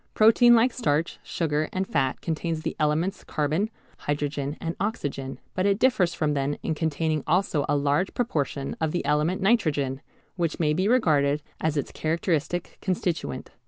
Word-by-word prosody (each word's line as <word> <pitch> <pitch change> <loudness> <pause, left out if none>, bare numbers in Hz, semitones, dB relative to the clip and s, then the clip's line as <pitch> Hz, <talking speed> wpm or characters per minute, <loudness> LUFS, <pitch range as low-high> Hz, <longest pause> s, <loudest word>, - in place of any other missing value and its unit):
Protein 235 +2 +7
like 235 +2 +4
starch, 165 - 0
sugar, 155 -2 -1
and 190 0 -2
fat 135 -3 0
contains 160 -1 -2
the 160 - -3
elements 160 +6 0
carbon, 155 +8 0 0.3
hydrogen, 145 0 -2
and 165 0 -3
oxygen, 145 -10 -3 0.2
but 185 +2 +1
it 200 -1 +3
differs 200 -9 +2
from 150 -2 0
them 140 0 0
in - - 0
containing 155 -1 -1
also 170 -3 +1
a 145 - +3
large 145 +6 +1
proportion 145 - -1
of 160 -1 0
the 175 - -1
element 160 +6 +1
nitrogen, 150 - +1 0.4
which 170 -3 -1
may 150 -2 +2
be 185 +5 +1
regarded 150 - +3 0.2
as 155 -1 0
its 145 - -2
characteristic 165 +1 -1
constituent. 175 -7 -2
160 Hz, 160 wpm, -26 LUFS, 145-185 Hz, 0.4 s, Protein